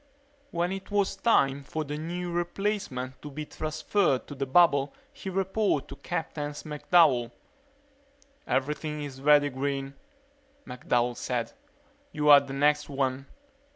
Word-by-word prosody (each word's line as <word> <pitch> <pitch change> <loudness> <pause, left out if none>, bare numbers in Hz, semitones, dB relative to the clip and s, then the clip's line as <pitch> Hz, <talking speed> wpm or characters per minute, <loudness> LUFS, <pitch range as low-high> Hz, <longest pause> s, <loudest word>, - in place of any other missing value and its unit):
When 175 +1 -1
it 195 0 -6
was 200 -1 +1
time 140 - +2
for 155 +3 -4
the 145 0 -5
new 175 +3 -4
replacement 175 -7 -3
to 150 - -8
be 150 +2 -6
transferred 155 -1 0
to - - -9
the 135 -1 -3
bubble 140 -2 +4 0.2
he 195 - -7
reported 190 -3 0
to - - -7
Captain 150 -1 -4
McDowell. 150 -4 +2 1.2
"Everything 150 +3 -1
is 135 -2 -8
ready, 145 0 +5
Green," 135 +1 -3 0.7
McDowell 125 -1 -1
said. 120 -2 -3 0.6
"You 150 -1 0
are 145 - +11
the 140 -1 -9
next 150 +2 +2
one." 135 -1 -2
150 Hz, 130 wpm, -28 LUFS, 135-175 Hz, 1.2 s, are